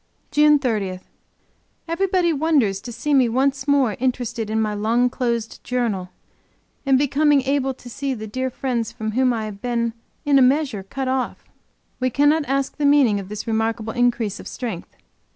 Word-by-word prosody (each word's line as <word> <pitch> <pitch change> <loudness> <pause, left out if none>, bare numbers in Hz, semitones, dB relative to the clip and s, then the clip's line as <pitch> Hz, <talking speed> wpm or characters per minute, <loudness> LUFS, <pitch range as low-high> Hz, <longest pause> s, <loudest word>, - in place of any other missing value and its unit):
JUNE 300 +1 +5
30. 210 -9 -2 0.9
Everybody 360 0 +1
wonders 275 -11 +1
to 240 - -8
see 240 +6 -2
me 260 -4 +4
once 265 +3 0
more 275 -7 +3
interested 240 -3 -2
in 220 0 0
my 215 -1 0
long 230 +4 +1
closed 235 -3 -3
Journal, 225 -7 -2 0.8
and 270 -1 +5
becoming 290 0 +3
able 270 -1 0
to 250 - -14
see 270 +2 -3
the 220 -2 -7
dear 260 +5 -3
friends 245 -3 -2
from 220 0 -4
whom 255 +3 +2
I 225 -2 -2
have 200 -2 -8
been, 235 -2 -1 0.3
in 285 -1 +5
a - - +5
measure 260 -4 +2
cut 265 +7 -5
off. 260 0 -3 0.5
We 255 0 +1
cannot 290 +4 +3
ask 275 0 -1
the 300 - -3
meaning 270 -8 +4
of 195 -1 -8
this 210 0 -5
remarkable 225 0 -1
increase 240 -4 0
of - - -9
strength. 225 -9 -5
250 Hz, 170 wpm, -22 LUFS, 220-275 Hz, 0.9 s, JUNE